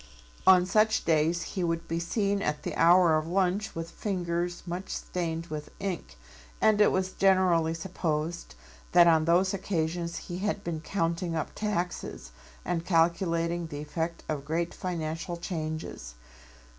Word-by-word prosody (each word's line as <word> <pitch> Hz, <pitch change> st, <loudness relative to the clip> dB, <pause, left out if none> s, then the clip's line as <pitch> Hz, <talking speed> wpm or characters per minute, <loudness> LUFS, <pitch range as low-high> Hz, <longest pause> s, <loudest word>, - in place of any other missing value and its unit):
On 185 Hz, -1 st, +7 dB
such 215 Hz, +3 st, +2 dB
days 165 Hz, +1 st, +2 dB
he 185 Hz, -, -3 dB
would 165 Hz, 0 st, -1 dB
be 165 Hz, +1 st, -1 dB
seen 200 Hz, +3 st, 0 dB
at 150 Hz, -5 st, -2 dB
the -, -, -3 dB
hour 170 Hz, -1 st, +6 dB
of 155 Hz, -, -6 dB
lunch 190 Hz, +4 st, 0 dB
with 165 Hz, +1 st, -5 dB
fingers 175 Hz, -3 st, -2 dB
much 180 Hz, +2 st, -5 dB
stained 165 Hz, -2 st, -3 dB
with 150 Hz, -2 st, -6 dB
ink, 175 Hz, -, -4 dB, 0.4 s
and 215 Hz, -1 st, +4 dB
it 210 Hz, -, +6 dB
was 185 Hz, 0 st, 0 dB
generally 185 Hz, -4 st, +3 dB
supposed 165 Hz, -2 st, -3 dB, 0.4 s
that 175 Hz, -1 st, +8 dB
on 160 Hz, -2 st, +4 dB
those 180 Hz, +3 st, +3 dB
occasions 170 Hz, -3 st, -2 dB
he 175 Hz, +1 st, -6 dB
had 205 Hz, 0 st, -2 dB
been 165 Hz, -2 st, -3 dB
counting 165 Hz, 0 st, -1 dB
up 160 Hz, -, -3 dB
taxes 180 Hz, -, -3 dB, 0.3 s
and 165 Hz, -1 st, -1 dB
calculating 170 Hz, 0 st, +1 dB
the 145 Hz, -2 st, -6 dB
effect 160 Hz, +3 st, -4 dB
of 150 Hz, -3 st, -3 dB
great 165 Hz, +4 st, -2 dB
financial 170 Hz, 0 st, -4 dB
changes. 155 Hz, -, -5 dB
170 Hz, 145 wpm, -28 LUFS, 165-185 Hz, 0.4 s, that